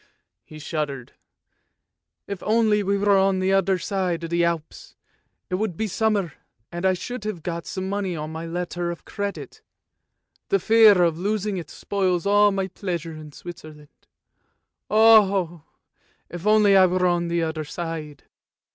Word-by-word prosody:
he 155 - -13
shuddered, 145 -5 -4 0.6
" - - -58 0.3
if 200 -2 -6
only 215 -1 +2
we 200 0 0
were 200 0 +3
on 195 0 +2
the 185 +1 +1
other 195 -1 +2
side 180 -3 -2
of 165 - -6
the 170 0 +2
Alps, 170 -2 -3 0.5
it - - -8
would 200 -7 -2
be 220 - -1
summer, 205 -5 0 0.4
and 175 +2 -1
I 190 - +3
should 245 +5 -6
have 195 -7 -5
got 170 -1 -5
some 190 -1 -4
money 195 -2 -2
on 155 0 -5
my 160 +1 -6
letter 175 0 -3
of 170 - -7
credit, 200 0 -6 0.9
the 395 - +3
fear 220 - +6
of 165 -1 +1
losing 205 +1 -1
it 165 -4 -7
spoils 185 -4 -1
all 205 +1 +4
my 195 -1 -2
pleasure 175 -4 -5
in 155 -1 -10
Switzerland! 155 -2 -12 0.8
Oh! 200 -7 +4 0.6
if 175 +3 -6
only 210 -2 +5
I 190 -1 +7
were 180 0 0
on 175 -1 +1
the 170 0 0
other 160 -1 -3
side." 155 -2 -6
180 Hz, 160 wpm, -23 LUFS, 165-200 Hz, 0.9 s, I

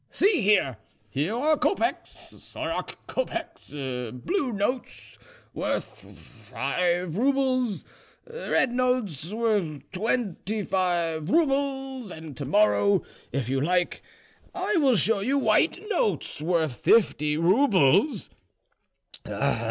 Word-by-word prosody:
"See 390 - +2
here, 190 - +3 0.3
here 155 - -1
are 305 +6 +3
kopecks, 380 - -2
sorok - - -5
kopecks, 340 -8 -4
blue 135 - -3
notes 230 +5 -3 0.3
worth - - -4 0.3
five 175 -2 0
roubles, 255 -2 +1 0.4
red 465 - 0
notes 245 - 0
worth 205 - 0
twenty 215 0 -2
five 170 -4 0
roubles, 270 - 0
and 160 -4 -9
to 140 - -5
morrow, 200 +3 +3 0.3
if 135 -4 -2
you 135 +1 0
like, 175 +3 0 0.5
I 380 +3 0
will 275 -6 +4
show 220 +1 +3
you 260 +8 +1
white 255 +7 +3
notes 205 - -1
worth 160 -5 0
fifty 150 -9 +3
roubles. 190 - +3
205 Hz, 100 wpm, -26 LUFS, 165-265 Hz, 0.5 s, will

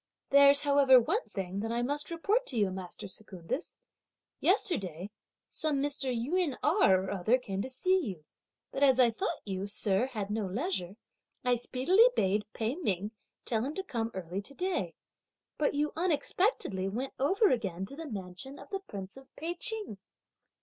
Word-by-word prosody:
There's 280 0 +7
however 280 -3 +6
one 355 - -1
thing 190 -1 -4
that 225 +2 -2
I 240 +1 0
must 290 +3 -2
report 400 +9 0
to 250 - -2
you, 200 -3 +2
master 185 -1 -7
Secundus. 190 - -6 0.6
Yesterday, 195 - 0 0.4
some 310 -2 0
Mr. 280 -1 +1
Yün 275 +5 0
Erh 245 - +4
or 190 - -4
other 200 +5 +2
came 195 -6 -4
to 260 - -4
see 365 +9 +2
you; 185 - -5 0.5
but 270 - -4
as 265 -2 +5
I 240 -2 +6
thought 220 - -3
you, 195 -1 -3
sir, 205 +2 +1
had 210 -6 -4
no 210 -2 -1
leisure, 200 - -2 0.5
I 250 - +4
speedily 260 - +3
bade 205 +2 +1
Pei 225 +2 -1
Ming 205 - -1 0.3
tell 225 -2 0
him 285 +4 -3
to 385 - -3
come 230 -10 -2
early 185 +1 -4
to 280 +7 -12
day. 365 +2 -2 0.6
But 295 -1 +1
you 300 +1 0
unexpectedly 325 - 0
went 255 +7 -4
over 385 - +3
again 195 -7 -1
to 245 - -11
the 325 +1 -7
mansion 195 +6 -7
of - - -13
the 390 - -2
Prince 195 - -9
of 270 0 -13
Pei 330 +3 -3
Ching." 420 - -4
250 Hz, 170 wpm, -31 LUFS, 195-300 Hz, 0.6 s, There's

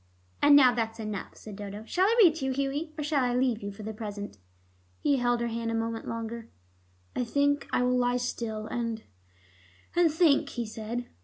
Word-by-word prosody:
"And 290 0 +7
now 260 -3 +7
that's 225 -1 -2
enough," 215 -3 -5
said 210 -2 -9
Dodo. 205 +1 -7
"Shall 370 +10 +2
I 460 +2 +2
read 340 -5 +7
to 270 - -3
you, 265 - 0
Hughie, 280 +4 -2
or 300 - -2
shall 290 -2 +1
I 245 -1 +1
leave 250 -3 +1
you 200 0 -4
for 200 +2 -10
the 220 +1 -5
present?" 205 - -7 0.6
He 285 -2 +2
held 245 -1 +1
her 235 - 0
hand 230 0 -3
a 230 - -1
moment 225 0 -3
longer. 230 0 -5 0.7
"I - - 0
think 285 +4 +1
I - - +2
will 250 0 +2
lie 245 0 +2
still 230 -3 -3
and 230 -1 -3 0.9
and 345 -2 +4
think," 305 -3 +3
he 240 -3 -3
said. 225 +3 -5
240 Hz, 205 wpm, -28 LUFS, 225-280 Hz, 0.9 s, And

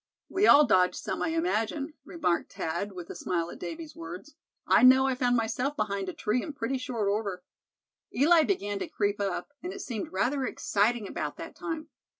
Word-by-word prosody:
"We 390 +2 +3
all 290 +1 +8
dodged 185 -6 +3
some, - - -4
I - - +1
imagine," 310 -3 -1
remarked 235 - -1
Thad, 170 +6 -3
with 175 -2 -8
a - - -8
smile 170 -1 -2
at - - -10
Davy's 325 -2 -7
words. 175 - -8 0.3
"I - - +5
know 260 +1 +7
I 265 - +2
found 250 -1 +1
myself 245 +5 0
behind 200 -3 -1
a - - -5
tree 220 +4 0
in 305 - -6
pretty 265 0 -2
short 235 -5 -2
order. 200 -3 -1 0.7
Eli 320 +6 +5
began 205 - -1
to - - -3
creep 205 0 -1
up, 195 +4 -2
and 360 - -5
it 390 0 -7
seemed 225 -6 -5
rather 255 +9 0
exciting 220 -2 0
about - - -4
that - - -8
time. 320 -1 -5
230 Hz, 190 wpm, -28 LUFS, 200-290 Hz, 0.7 s, all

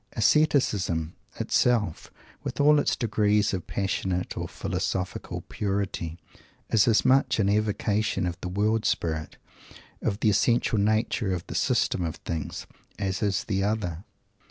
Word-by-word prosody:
Ascetism 105 - +2 0.3
itself, 110 -9 +1 0.3
with - - -5
all 150 +1 +6
its - - +1
degrees 105 -3 +1
of 90 - -4
passionate 95 -2 -2
or - - -3
philosophical 90 -1 -3
purity, 95 -5 -3 0.5
is 110 -1 +4
as 115 -2 +3
much 130 0 +4
an 100 -3 +2
evocation 105 0 +1
of 90 -1 -2
the 90 - -4
world 105 +4 +1
spirit 80 -2 -1 0.6
of 100 - -1
the 110 - +4
essential 115 +1 +2
nature 110 0 +1
of 85 - -6
the - - -7
System 90 - +1
of 80 -2 -3
Things 80 -3 -5 0.3
as 100 +2 -2
is 100 -2 +1
the 95 -3 -1
other. 100 -5 -2
100 Hz, 135 wpm, -26 LUFS, 90-110 Hz, 0.6 s, all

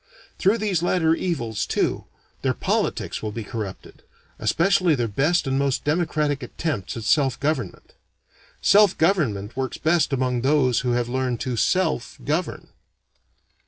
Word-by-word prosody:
Through 200 +4 +3
these 205 -6 0
latter 170 -2 +2
evils, 135 - -2
too, - - -1 0.4
their - - 0
politics - - -1
will 110 - -3
be 115 +1 -5
corrupted; 105 -2 -7 0.4
especially 175 -1 +2
their 120 -3 -1
best 150 - +1
and 135 0 0
most 140 -2 0
democratic 150 -2 0
attempts 125 - -4
at 115 - -5
self 135 +2 +2
government. 155 +3 -3 0.7
Self 205 -2 +5
government 125 - +1
works 130 -1 -3
best 160 -1 +2
among 125 -2 0
those 130 -2 +3
who 125 -1 -1
have 120 -1 0
learned 125 -1 -1
to 125 -2 -2
self 160 - 0
govern. 155 +4 -2
140 Hz, 140 wpm, -23 LUFS, 120-165 Hz, 0.7 s, Self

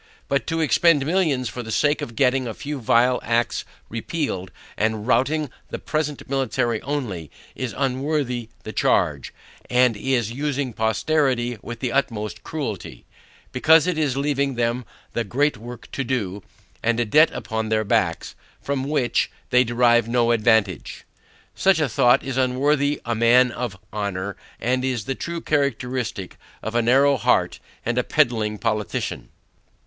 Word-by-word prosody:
But 140 0 0
to 165 0 0
expend 155 -1 +4
millions 155 -7 +1
for 125 - -5
the 110 - -8
sake 145 +5 +2
of 115 - -6
getting 130 -1 +2
a 115 - -5
few 145 -1 -5
vile 125 +2 +3
acts 120 +1 0 0.2
repealed, 115 - -3 0.3
and 110 0 -1
routing 130 +4 +1 0.2
the - - -4
present 150 -2 -3
ministry 130 -4 0
only, 115 - -4 0.2
is 130 -3 -5
unworthy 130 -3 -1
the - - -7
charge, - - +1 0.4
and 125 -2 +4
is 120 0 0
using 140 -1 -2
posterity 120 +1 0
with 120 -1 -8
the 125 -2 -1
utmost 115 -6 -1
cruelty; 140 - -5 0.5
because 160 +5 +5
it 180 -1 0
is 145 -4 0
leaving 140 -1 0
them 120 +1 -1 0.3
the 115 - 0
great 145 +8 +1
work 120 +2 -10
to 135 - -2
do, 105 -7 -2 0.4
and 120 0 +1
a 120 - +2
debt 150 +9 +5
upon 110 0 -4
their 110 0 +2
backs, 90 -5 0 0.3
from 140 -1 -2
which, 140 -4 +1 0.2
they 125 0 +6
derive 120 -1 +3
no 120 -1 +2
advantage. 110 -5 +1 0.5
Such 190 -3 +3
a 150 - +2
thought 125 +2 +3
is 135 -1 -4
unworthy 140 +3 +1
a 120 - 0
man 120 +2 +4
of 120 -5 -4 0.2
honor, 100 -2 -3 0.2
and 125 +2 0
is 125 -6 -1
the 135 - -1
true 170 +5 -5
characteristic 125 -8 -2 0.3
of 110 - -4
a 120 - +3
narrow 135 +4 +4
heart 105 - +1 0.3
and - - +1
a - - +1
pedling 110 -3 +1
politician. 105 - -2
125 Hz, 155 wpm, -23 LUFS, 115-140 Hz, 0.5 s, they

